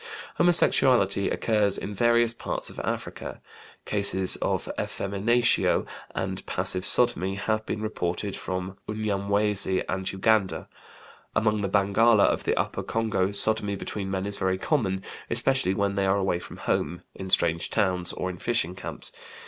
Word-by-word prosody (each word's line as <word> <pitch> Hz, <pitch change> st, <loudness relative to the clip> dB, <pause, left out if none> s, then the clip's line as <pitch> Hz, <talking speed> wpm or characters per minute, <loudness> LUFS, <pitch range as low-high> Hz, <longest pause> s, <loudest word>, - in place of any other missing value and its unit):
Homosexuality; 125 Hz, -, +3 dB
occurs 105 Hz, -3 st, +1 dB
in 105 Hz, -, -5 dB
various 120 Hz, +2 st, +3 dB
parts -, -, -3 dB
of -, -, -9 dB
Africa. -, -, -5 dB, 0.5 s
Cases 100 Hz, -2 st, +2 dB
of -, -, -2 dB
effeminatio 110 Hz, +5 st, +1 dB, 0.3 s
and 95 Hz, 0 st, -3 dB
passive 90 Hz, 0 st, +2 dB
sodomy 95 Hz, -6 st, +4 dB
have 110 Hz, +2 st, -1 dB
been 105 Hz, -, -3 dB
reported 100 Hz, -2 st, -3 dB
from 95 Hz, +1 st, -5 dB
Unyamwezi 100 Hz, -2 st, 0 dB
and 95 Hz, +1 st, -2 dB
Uganda. 95 Hz, 0 st, +1 dB, 0.7 s
Among 110 Hz, -1 st, +1 dB
the 100 Hz, -, -1 dB
Bangala 105 Hz, +2 st, +4 dB
of -, -, 0 dB
the -, -, +1 dB
Upper -, -, -1 dB
Congo 110 Hz, -4 st, -1 dB
sodomy 105 Hz, 0 st, +1 dB
between 100 Hz, 0 st, -5 dB
men 95 Hz, 0 st, -2 dB
is 100 Hz, 0 st, +2 dB
very 95 Hz, 0 st, 0 dB
common, 95 Hz, -7 st, -1 dB, 0.3 s
especially 130 Hz, -8 st, +1 dB
when 100 Hz, 0 st, 0 dB
they 100 Hz, -1 st, 0 dB
are 95 Hz, +1 st, +2 dB
away 95 Hz, -3 st, 0 dB
from -, -, -10 dB
home, 85 Hz, +1 st, -2 dB
in 95 Hz, -, -8 dB
strange 85 Hz, -2 st, +1 dB
towns, 90 Hz, -4 st, +1 dB
or 95 Hz, -, -3 dB
in 90 Hz, -, -11 dB
fishing 115 Hz, -7 st, 0 dB
camps. 95 Hz, -, -6 dB
100 Hz, 145 wpm, -26 LUFS, 95-110 Hz, 0.7 s, sodomy